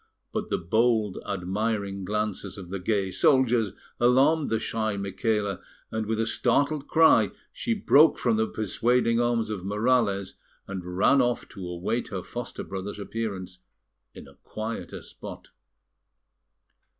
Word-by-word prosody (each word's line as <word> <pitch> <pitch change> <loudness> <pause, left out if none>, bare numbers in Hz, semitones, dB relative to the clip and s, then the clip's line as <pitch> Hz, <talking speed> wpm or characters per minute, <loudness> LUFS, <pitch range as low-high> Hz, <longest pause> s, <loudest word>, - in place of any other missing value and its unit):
But - - -3
the - - +1
bold, 110 +2 +1
admiring 100 +1 -2
glances 105 -1 -3
of 95 -3 -9
the 100 - -3
gay 95 0 0
soldiers 120 -3 +3 0.3
alarmed 135 +6 +4
the 110 - +1
shy 110 -2 -2
Micaela, 100 0 -1 0.3
and 110 -1 -2
with 110 0 -1
a 115 - +2
startled 145 +5 +1
cry 160 0 +5 0.2
she 235 -2 -1
broke 160 -6 +5
from 115 -2 +1
the 110 0 +1
persuading 115 +2 +1
arms 120 -2 +1
of 100 -4 -4
Morales, 105 -1 +1 0.3
and 90 -2 -6
ran 135 +7 +5
off 120 -1 0
to 95 -3 -8
await 90 +7 -2
her 95 -3 -5
foster 120 -1 -6
brother's 95 +1 -6
appearance 100 -4 -5 0.6
in - - -11
a - - -15
quieter 110 +1 -6
spot. - - -10
110 Hz, 140 wpm, -26 LUFS, 100-120 Hz, 0.6 s, cry